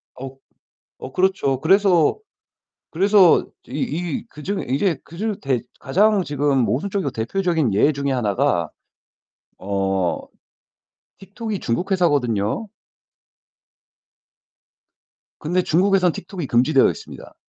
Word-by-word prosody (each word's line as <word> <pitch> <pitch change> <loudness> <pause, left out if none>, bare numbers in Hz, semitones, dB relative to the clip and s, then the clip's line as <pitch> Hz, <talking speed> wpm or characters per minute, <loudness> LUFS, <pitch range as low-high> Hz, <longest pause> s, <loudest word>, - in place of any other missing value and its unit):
아우 135 +1 -9 0.6
어 130 - -8
그렇죠. 185 -8 +1
그래서, 180 -2 +3 0.7
그래서 190 0 +4 0.2
이 - - -12
이 165 +1 -3
그중 190 +7 -5
이게 145 +4 0
그중 205 +6 -4
대 130 -3 0 0.2
가장 200 +8 +2
지금 145 -2 0
모순적이고 160 - -1
대표적인 160 - -1
예 140 +9 +4
중에 140 0 -2
하나가 110 -7 0 0.9
어 95 -2 -1 1.0
TikTok이 205 +2 -6
중국 145 +12 -2
회사거든요. 140 - 0 2.7
근데 175 +4 0
중국에선 185 +2 +2
TikTok이 175 -3 -7
금지되어 130 +4 +4
있습니다. - - -9
155 Hz, 260 characters per minute, -21 LUFS, 130-190 Hz, 2.7 s, 그래서